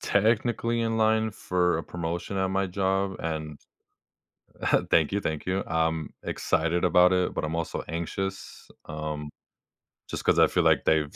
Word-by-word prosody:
technically 115 +2 +1
in 115 -1 0
line 110 -1 +2
for 90 -3 0
a - - -3
promotion 85 +4 -4
at 95 - +1
my 95 0 0
job, 95 +1 -1
and 75 -2 -4 1.3
Thank 80 -2 +4
you. 100 - +1
Thank 80 -4 -3
you. 95 +1 0
I'm 80 -2 -1
excited 85 +3 0
about 90 0 +5
it, 90 -1 +1
but - - -3
I'm 75 +1 -2
also 85 -1 -3
anxious, 95 +4 -5 0.2
um, 75 -1 -5 0.8
just - - -4
'cause - - +3
I - - +7
feel - - +1
like - - +3
they've 75 -2 +1
90 Hz, 155 wpm, -27 LUFS, 80-95 Hz, 1.3 s, I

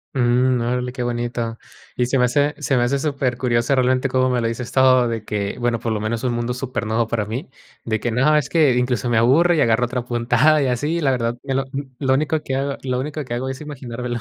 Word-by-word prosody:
Mm. 125 0 +2
Órale, 125 +1 -1
qué 130 - -5
bonito. 120 -1 -3 0.4
Y 125 - +1
se 125 +2 0
me 125 - +4
hace 145 +4 +1
se 135 -2 0
me 120 - +3
hace 135 +3 0
supercurioso 125 -3 0
realmente 130 +1 +2
cómo 130 0 +2
me 125 -1 0
lo 115 - 0
dices 115 +1 -4
todo, 130 -2 +4
de 115 -2 -4
que, 100 -2 -3
bueno, 120 -1 0
por 115 0 -3
lo 110 - -1
menos 110 +3 -3
un 125 - 0
mundo 120 +1 -2
supernuevo 120 -3 -2
para 110 -2 -1
mí. 120 +6 -5 0.3
De 110 -2 -1
que 120 - -2
no, 135 +6 +3
es 145 - 0
que 155 -6 +4
incluso 125 -1 0
me 115 - +2
aburre 150 +10 +4
y - - +3
agarro 115 +1 +3
otra 125 0 -4
puntada 120 +5 +2
y 135 - +1
así, 145 +7 -1
la 140 - +2
verdad 120 -1 -1
que 135 -1 -2
lo 135 - +1
mm, 140 - -3 0.2
lo 135 -2 +2
único 155 +3 +1
que 130 - -3
hago 140 +1 -2
lo 125 -1 -1
único 150 +2 -4
que 120 - -5
hago 130 +2 -2
es 135 - -5
imaginármelo. 125 -4 -5
125 Hz, 245 wpm, -21 LUFS, 120-135 Hz, 0.4 s, me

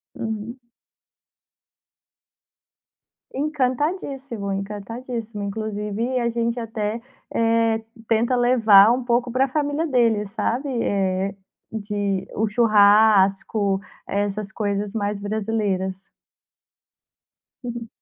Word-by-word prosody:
Uhum. 220 +3 -5 2.7
Encantadíssimo, 270 - -2
encantadíssimo. 210 +3 -5
Inclusive 215 +4 -2
a 235 -1 +1
gente 235 +1 -1
até, 225 -1 -3 0.3
eh, 230 -1 +2 0.3
tenta 235 +3 +2
levar 225 -4 +6
um 250 +1 0
pouco 240 0 +1
pra 260 +3 +2
família 295 +3 -1
dele, 230 -6 +2
sabe. 240 +6 -2
Eh, 195 0 0 0.4
de 205 -3 -2
o 220 - +1
churrasco, 205 -2 +4 0.3
essas 205 +1 -2
coisas 205 -1 -2
mais 205 -2 -2
brasileiras. 200 -3 -2 1.5
Uhum. 240 -1 -5
220 Hz, 85 wpm, -23 LUFS, 205-240 Hz, 2.7 s, levar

